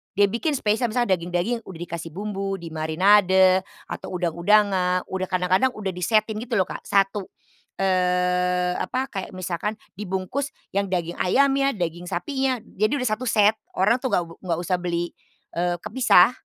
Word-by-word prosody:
dia 200 0 +4
bikin 285 +7 -1
spesial 225 0 +1
misalnya 215 -5 +1
daging-daging 175 +7 -1
udah 175 -4 -9
dikasih 170 -1 -6
bumbu, 195 -1 -3
dimarinade, 185 +3 +4 0.2
atau - - -7
udang-udangan, 180 +1 +2
udah 185 0 -2
kadang-kadang 185 +7 +2
udah 200 -3 -3
disetin 215 +4 +1
gitu 235 +1 -3
loh, 190 - +4
Kak, - - -7
1, 195 0 +1 0.5
eee, 180 -1 +1
apa, 260 +1 -2
kayak 190 -2 -6
misalkan 185 +3 -3 0.2
dibungkus 205 +9 -3 0.2
yang 200 0 0
daging 175 -2 -3
ayamnya, 275 +5 +3
daging 175 -2 -4
sapinya, 260 +6 -1
jadi 215 +4 -1
udah 250 -4 0
1 250 +4 -2
set. 215 -1 +3 0.2
Orang 210 +7 +3
tuh 260 - -2
nggak 195 -7 +1
be 165 0 -12
nggak 175 -3 -2
usah 180 +1 0
beli, 175 -1 -2 0.4
eee, 175 +1 0
kepisah. 215 -3 +5
190 Hz, 155 wpm, -24 LUFS, 180-215 Hz, 0.5 s, kepisah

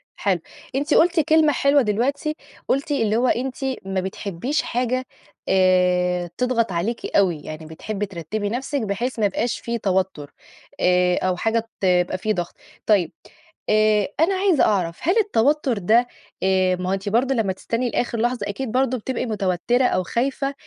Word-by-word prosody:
حلو، 190 -3 0 0.4
أنتِ 280 +2 0
قلتِ 345 +1 +4
كلمة 310 0 +4
حلوة 280 +1 +3
دلوقتي، 255 +7 -1 0.3
قلتِ 275 +3 0
اللي 225 -7 +1
هو 245 +3 +2
أنتِ 255 +2 0 0.3
ما 195 -1 -1
بتحبيش 195 - -3
حاجة 250 +1 -1 0.4
آآ، 180 -1 +2
تضغط 245 -4 +1
عليكِ 190 +8 -3
أوي، 175 -6 +2
يعني 155 +1 -8
بتحبي 195 +6 -4
ترتبي 200 +3 -4
نَفسِك 265 +5 -2
بحيث 225 +4 -3
ما 215 - +3
يبقاش 220 +4 -1
فيه 235 0 -3
توتّر 190 -8 -1 0.5
آآ، 180 0 +3
أو 185 - +1
حاجة 225 +3 -1
ت - - -14
يبقى 180 -1 +2
في 215 +3 -1
ضغط. 175 -3 -4 0.3
طيّب 195 -7 +3 0.6
آآ، 215 -1 +3
أنا 345 +5 +3
عايزة 375 -5 +3
أعرف 175 -5 0
هل 360 +7 +1
التوتّر 295 - +2
ده 225 +6 +3 0.4
آآ، 185 -1 +2
ما 180 0 -4
هو - - +1
أنتِ 195 +1 -3
برضو 250 +5 +2
لمّا 220 -6 0
تستني 230 +6 -2
لآخر 240 0 -1
لحظة 240 -2 0
أكيد 225 +3 -4
برضو 255 0 +1
بتِبقي 250 +2 -3
متوتّرة 215 +3 0
أو 185 - +1
خايفة 270 +7 -1
215 Hz, 165 wpm, -22 LUFS, 185-255 Hz, 0.6 s, قلتِ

